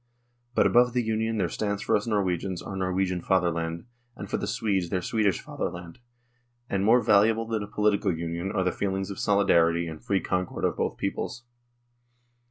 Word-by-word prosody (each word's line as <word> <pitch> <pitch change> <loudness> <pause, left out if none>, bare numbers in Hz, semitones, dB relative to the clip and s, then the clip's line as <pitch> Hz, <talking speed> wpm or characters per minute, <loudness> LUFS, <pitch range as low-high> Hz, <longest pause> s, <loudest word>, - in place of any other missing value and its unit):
" 120 0 -41
But - - +4
above 120 0 +4
the 125 -1 +1
Union 110 0 -1
there 95 -4 +1
stands 100 +3 -2
for - - +2
us 105 - -1
Norwegians 95 -4 -1
our 95 - -6
Norwegian 95 -1 -1
fatherland, 85 -2 0 0.3
and - - -7
for - - +1
the - - -3
Swedes 95 -5 -1
their 95 - 0
Swedish 105 -4 +1
fatherland, 85 -1 -6 0.7
and 100 -3 -1
more 120 +4 +5
valuable 110 +3 +4
than 110 -1 -2
a 105 - -5
political 105 -1 +1
union 85 +3 -3
are 95 - 0
the 90 - +1
feelings 95 0 -2
of 100 - -7
solidarity 85 -4 +3
and 80 -1 -8
free 100 -1 +1
concord 90 -1 -2
of - - 0
both - - -1
peoples. 120 - -3
95 Hz, 180 wpm, -27 LUFS, 90-110 Hz, 0.7 s, more